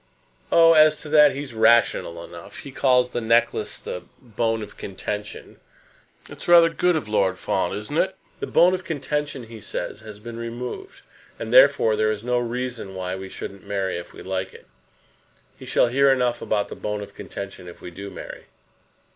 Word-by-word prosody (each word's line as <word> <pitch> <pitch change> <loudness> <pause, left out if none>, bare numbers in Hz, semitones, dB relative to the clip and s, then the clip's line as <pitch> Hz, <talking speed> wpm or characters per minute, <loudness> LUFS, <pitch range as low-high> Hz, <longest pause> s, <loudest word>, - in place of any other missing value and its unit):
"Oh, 165 0 +7
as 155 -1 +6
to 150 - -9
that 150 -1 +6
he's 140 -3 -6
rational 110 -6 +3
enough. 85 0 -11
He 140 - -9
calls 125 -2 +3
the 120 - -2
necklace 115 +1 +1
the 90 - -6 0.2
bone 115 -2 -2
of 105 - -11
contention. 105 +2 -6 0.7
That's - - -9
rather 170 -1 +7
good 180 +1 +1
for 105 - -10
Lord 95 -3 +2
Fawn; 95 - -1
isn't 105 +8 -6
it? 190 0 +1 0.2
The - - -4
bone 180 +2 +5
of 185 0 -2
contention, 150 -4 -3
he 115 -1 -11
says, - - -5
has 110 -2 -10
been 115 +2 -9
removed; 120 - -6 0.4
and, - - -5
therefore, 305 - +6
there 110 0 +2
is 105 0 -3
no 125 0 +1
reason 120 -4 -4
why 90 0 -3
we 95 0 -7
shouldn't 100 0 -8
marry 95 -2 -1
if 85 - -11
we - - -11
like 95 0 -4
it. - - -14 0.9
He - - -10
shall - - +3
hear 140 +2 +4
enough 125 -2 +1
about 105 -2 -1
the - - -7
bone 105 0 -4
of - - -12
contention 100 -2 -8
if 85 - -11
we 90 - -9
do 100 +3 -8
'marry.'" 95 - -9
115 Hz, 185 wpm, -23 LUFS, 100-140 Hz, 0.9 s, Oh